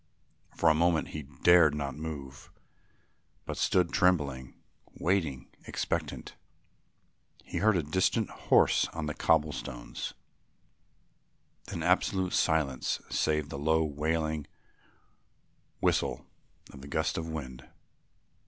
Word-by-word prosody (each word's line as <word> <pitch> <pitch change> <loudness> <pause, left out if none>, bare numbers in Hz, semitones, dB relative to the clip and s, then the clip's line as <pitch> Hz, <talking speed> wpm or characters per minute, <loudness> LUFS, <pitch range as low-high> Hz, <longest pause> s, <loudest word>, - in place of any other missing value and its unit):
For 85 - +2
a 80 - +7
moment 80 0 +2
he 75 - -5
dared 80 +2 +4
not 70 -3 -3
move, 75 -4 -7 1.0
but - - -4
stood 90 -2 +1
trembling, 70 -8 +1 0.4
waiting, 80 -8 0 0.2
expectant. - - -3 1.1
He - - -4
heard 105 +1 +4
a 85 - 0
distant 95 +8 +1 0.2
horse - - +5
on 80 -2 -3
the 75 - -3
cobble 75 +1 +2
stones, - - -6 1.5
then - - -5
absolute 95 -1 +1
silence 75 -5 +1
save 75 -1 0
the 70 - -5
low 80 +2 +2
wailing 80 0 -1 1.3
whistle - - +1 0.5
of 70 -1 -11
a - - -9
gust 80 +2 -1
of 80 0 -5
wind. 65 -5 -7
80 Hz, 110 wpm, -30 LUFS, 70-85 Hz, 1.5 s, a